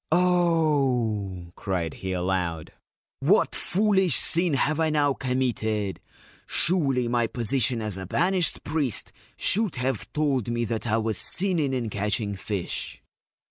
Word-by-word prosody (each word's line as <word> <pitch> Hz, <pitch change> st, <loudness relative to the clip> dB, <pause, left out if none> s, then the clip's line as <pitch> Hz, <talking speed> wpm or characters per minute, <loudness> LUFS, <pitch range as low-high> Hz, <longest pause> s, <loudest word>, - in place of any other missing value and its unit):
c 165 Hz, -, +5 dB
Oh/ 135 Hz, -, +1 dB
cried 90 Hz, -5 st, -3 dB
he 95 Hz, -, -5 dB
aloud, 90 Hz, -3 st, -2 dB, 0.5 s
1 -, -, 0 dB
what -, -, +3 dB
foolish 190 Hz, -2 st, +2 dB
sin 170 Hz, -3 st, +2 dB
have 150 Hz, +3 st, 0 dB
I 160 Hz, -1 st, +2 dB
now 145 Hz, -2 st, +2 dB
committed? 110 Hz, -7 st, -2 dB, 0.5 s
Surely 140 Hz, -8 st, +2 dB
my 120 Hz, -1 st, +1 dB
position 120 Hz, 0 st, 0 dB
as 105 Hz, -3 st, -3 dB
a 95 Hz, -1 st, -6 dB
banished 180 Hz, -, +1 dB
priest 145 Hz, -7 st, -1 dB, 0.3 s
should 215 Hz, -2 st, +2 dB
have 125 Hz, -3 st, -2 dB
told 140 Hz, -7 st, 0 dB
me 120 Hz, 0 st, -1 dB
that 115 Hz, +1 st, -3 dB
I 110 Hz, 0 st, +2 dB
was 110 Hz, -2 st, -1 dB
sinning 170 Hz, -8 st, +1 dB
in 120 Hz, -4 st, -3 dB
catching 105 Hz, +1 st, -1 dB
fish 100 Hz, -1 st, -4 dB
125 Hz, 140 wpm, -25 LUFS, 105-155 Hz, 0.5 s, c